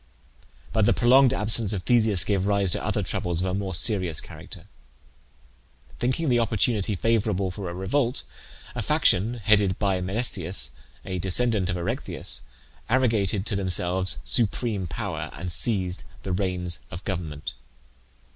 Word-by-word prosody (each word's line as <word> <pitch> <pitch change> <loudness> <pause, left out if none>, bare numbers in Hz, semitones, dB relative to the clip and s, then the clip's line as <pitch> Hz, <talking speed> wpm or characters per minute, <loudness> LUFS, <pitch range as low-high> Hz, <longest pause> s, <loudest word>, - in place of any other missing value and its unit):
But 110 -3 +3
the - - +4
prolonged 130 +2 +5
absence 110 -3 +3
of 95 -3 -3
Theseus 110 -5 +3
gave 100 -2 0
rise 100 -3 +2
to - - -1
other - - -1
troubles 85 -1 -2
of 90 - +1
a 95 - -2
more 95 -2 -2
serious 90 -2 0
character. - - -10 1.3
Thinking 130 +7 0
the 120 -2 +3
opportunity 110 -2 0
favourable 100 -2 0
for 95 -1 -6
a - - -6
revolt, 120 +7 0 0.5
a - - -3
faction, 110 +7 +2
headed 100 -3 +2
by 95 -3 0
Menesthius, 95 -2 -2 0.3
a 95 -1 -4
descendant 100 +1 +4
of 90 - -1
Erechtheus, 110 +9 -3 0.5
arrogated 110 -6 +1
to 110 - -1
themselves 90 -3 +2
supreme 105 - +1
power, 75 - -4
and 90 0 -6
seized 95 -2 0 0.2
the 95 - -4
reins 90 -2 -1
of 85 +3 -9
government. 80 -6 -4
100 Hz, 140 wpm, -25 LUFS, 90-115 Hz, 1.3 s, prolonged